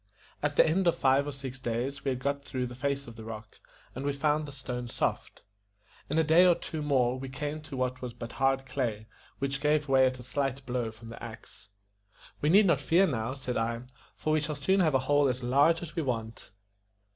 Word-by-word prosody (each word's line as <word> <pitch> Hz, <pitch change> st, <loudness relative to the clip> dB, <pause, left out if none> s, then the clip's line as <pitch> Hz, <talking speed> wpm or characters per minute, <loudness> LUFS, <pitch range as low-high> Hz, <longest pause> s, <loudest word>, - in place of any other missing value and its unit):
At 145 Hz, 0 st, 0 dB
the -, -, +6 dB
end 180 Hz, +3 st, +2 dB
of 170 Hz, -, +4 dB
five 135 Hz, +2 st, +3 dB
or -, -, -2 dB
six 135 Hz, -1 st, -7 dB
days 130 Hz, +3 st, -3 dB
we 140 Hz, -, 0 dB
had 130 Hz, -, 0 dB
got 140 Hz, +2 st, -2 dB
through 130 Hz, -3 st, -3 dB
the 125 Hz, -, -6 dB
face 140 Hz, +2 st, -2 dB
of 115 Hz, -1 st, -11 dB
the 110 Hz, -, -8 dB
rock, 110 Hz, -1 st, -9 dB, 0.3 s
and 130 Hz, -, -5 dB
we 145 Hz, 0 st, 0 dB
found 150 Hz, +2 st, +1 dB
the -, -, -7 dB
stone 125 Hz, -3 st, -5 dB
soft. -, -, -3 dB, 0.7 s
In 150 Hz, -, 0 dB
a 160 Hz, -, +5 dB
day 160 Hz, +3 st, +6 dB
or 180 Hz, -2 st, +6 dB
two 160 Hz, -1 st, -5 dB
more 130 Hz, -4 st, +2 dB
we 135 Hz, 0 st, -6 dB
came 145 Hz, +4 st, -4 dB
to 150 Hz, -3 st, -8 dB
what 130 Hz, 0 st, -1 dB
was 125 Hz, -1 st, -4 dB
but 115 Hz, 0 st, -8 dB
hard 135 Hz, 0 st, +1 dB
clay, 115 Hz, -4 st, -2 dB, 0.3 s
which 140 Hz, 0 st, -2 dB
gave 150 Hz, 0 st, +2 dB
way 130 Hz, -1 st, +5 dB
at 130 Hz, 0 st, -2 dB
a 125 Hz, -, -10 dB
slight 135 Hz, +1 st, -2 dB
blow 120 Hz, -2 st, -1 dB
from 110 Hz, +1 st, -12 dB
the 115 Hz, -, -10 dB
axe. 105 Hz, -4 st, -11 dB, 0.7 s
"We 150 Hz, -, +2 dB
need 200 Hz, +5 st, +7 dB
not 170 Hz, -, +3 dB
fear 180 Hz, +4 st, +4 dB
now," 125 Hz, -5 st, -2 dB
said 130 Hz, -2 st, -3 dB
I, 115 Hz, +1 st, -1 dB, 0.3 s
"for 155 Hz, -, -1 dB
we 155 Hz, -, +4 dB
shall 150 Hz, 0 st, -2 dB
soon 190 Hz, +8 st, +2 dB
have 160 Hz, -6 st, +3 dB
a 130 Hz, 0 st, +1 dB
hole 145 Hz, -1 st, +4 dB
as 125 Hz, 0 st, -3 dB
large 145 Hz, +7 st, +3 dB
as 155 Hz, -2 st, -8 dB
we 165 Hz, -, 0 dB
want." 115 Hz, -5 st, -4 dB
135 Hz, 230 wpm, -29 LUFS, 125-150 Hz, 0.7 s, need